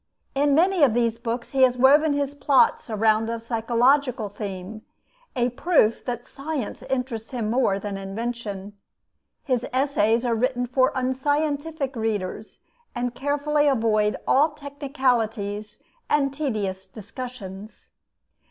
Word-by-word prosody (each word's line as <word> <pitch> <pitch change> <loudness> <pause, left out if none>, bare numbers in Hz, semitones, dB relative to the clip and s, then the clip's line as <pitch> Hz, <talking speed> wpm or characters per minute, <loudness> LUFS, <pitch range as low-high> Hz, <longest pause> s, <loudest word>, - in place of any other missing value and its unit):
In 280 0 +2
many 360 +2 +3
of 260 -6 +5
these 230 -1 +1
books 235 +1 -4
he 270 - +1
has 250 -1 +5
woven 290 +4 +5
his 285 -1 -1
plots 275 -3 +2
around 220 +1 +2
a 230 0 -2
psychological 235 +1 +1
theme; 200 0 -7 0.5
a 245 -1 +1
proof 245 -4 +2
that 240 -1 -4
science 275 -5 -5
interests 250 -4 -3
him 230 -4 -2
more 235 -5 +2
than 200 0 -5
invention. 205 0 -5 0.7
His 255 -4 0
essays 250 -3 +2
are 240 - +1
written 245 +2 0
for 255 +1 +2
unscientific 285 +2 -1
readers, 215 -3 -3 0.3
and 245 0 -2
carefully 290 +3 +1
avoid 220 -5 +2
all 295 +3 +4
technicalities 245 -8 -2 0.3
and 275 -2 +2
tedious 210 -10 -3
discussions. 215 -2 -9
245 Hz, 125 wpm, -24 LUFS, 220-275 Hz, 0.7 s, of